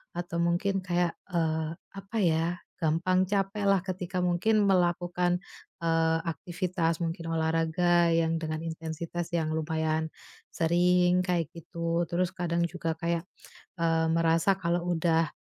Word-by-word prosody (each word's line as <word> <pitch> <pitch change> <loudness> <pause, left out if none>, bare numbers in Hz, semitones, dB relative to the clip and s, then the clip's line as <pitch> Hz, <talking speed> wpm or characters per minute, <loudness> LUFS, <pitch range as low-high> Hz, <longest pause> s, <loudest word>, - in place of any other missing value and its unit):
Atau 175 -1 -3
mungkin 175 +3 +1
kayak, 175 -1 +1 0.2
eee, 160 -2 0 0.2
apa 195 +3 -6
ya, 165 -1 +2 0.3
gampang 175 +4 +2
capeklah 200 0 +2
ketika 185 -1 -3
mungkin 205 +5 +2
melakukan, 175 -1 +1 0.4
eee, 165 0 +2
aktivitas 170 +1 -2
mungkin 165 0 -3
olahraga, 165 +2 +2
yang 165 0 +2
dengan 155 -1 -3
intensitas 165 +1 -4
yang 160 -2 0
lumayan 160 0 -1 0.5
sering, 180 +2 +3
kayak 175 -3 0
gitu. 170 0 -2
Terus 180 +1 0
kadang 170 -1 0
juga 165 -1 -3
kayak, 170 0 -1 0.5
eee, 165 -1 +2
merasa 165 +3 +3
kalau 175 0 0
udah, 165 -1 +2
170 Hz, 120 wpm, -28 LUFS, 165-180 Hz, 0.5 s, sering